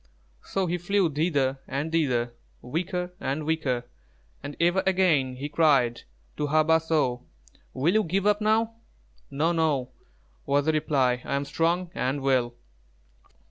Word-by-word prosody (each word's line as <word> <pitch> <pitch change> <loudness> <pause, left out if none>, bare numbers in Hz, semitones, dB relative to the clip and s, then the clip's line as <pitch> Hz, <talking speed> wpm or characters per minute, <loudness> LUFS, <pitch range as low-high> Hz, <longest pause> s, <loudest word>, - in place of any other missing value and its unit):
So 195 -1 -1
he 175 0 -2
flew 190 -1 +1
thither 140 -4 0
and 145 +4 -3
thither, 125 -7 0 0.3
weaker 180 +6 -3
and 150 -4 -3
weaker, 150 -6 -1 0.6
and 145 - -7
ever 175 +3 +3
and - - -3
again 165 -9 +2
he 135 +3 -5
cried 140 -6 +2 0.3
to 150 - -1
Hā 155 +1 +3
bāh 160 0 +4
so: 150 -7 0 0.5
"Will 145 +7 +2
you 215 0 +3
give 190 +3 -1
up, 210 0 +3
now?" 225 +1 +1 0.5
"No, 155 +5 0
no," 150 -6 0 0.6
was 140 +1 +2
the 160 - +3
reply; 135 -5 +1
"I - - -2
am 140 +1 -1
strong 170 +4 0
and 135 -3 -2
well." 125 -3 +1
155 Hz, 150 wpm, -26 LUFS, 135-175 Hz, 0.6 s, bāh